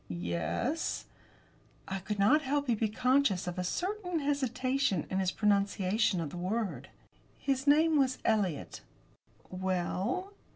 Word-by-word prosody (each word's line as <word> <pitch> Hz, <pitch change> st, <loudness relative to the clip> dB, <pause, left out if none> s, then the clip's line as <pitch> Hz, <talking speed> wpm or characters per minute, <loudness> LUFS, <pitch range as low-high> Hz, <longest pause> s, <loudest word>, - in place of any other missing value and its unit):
"Ye 85 Hz, -1 st, -4 dB
es." 85 Hz, -, -1 dB, 0.8 s
I 195 Hz, 0 st, -3 dB
could 205 Hz, +3 st, -4 dB
not 255 Hz, +11 st, +4 dB
help 285 Hz, 0 st, 0 dB
but 235 Hz, -5 st, 0 dB
be 220 Hz, -, +1 dB
conscious 250 Hz, -3 st, +2 dB
of 180 Hz, 0 st, -4 dB
a -, -, 0 dB
certain 360 Hz, -, -2 dB
hesitation 260 Hz, -, 0 dB
in 190 Hz, -, +1 dB
his 190 Hz, -1 st, +1 dB
pronunciation 200 Hz, 0 st, +1 dB
of 155 Hz, -4 st, -3 dB
the -, -, -7 dB
word. 180 Hz, -, -2 dB, 0.5 s
"His 275 Hz, 0 st, -1 dB
name 310 Hz, +1 st, +5 dB
was 260 Hz, -1 st, +2 dB
Eliot." 200 Hz, -8 st, 0 dB, 0.7 s
"Well?" 190 Hz, -, -2 dB
215 Hz, 135 wpm, -31 LUFS, 185-275 Hz, 0.8 s, name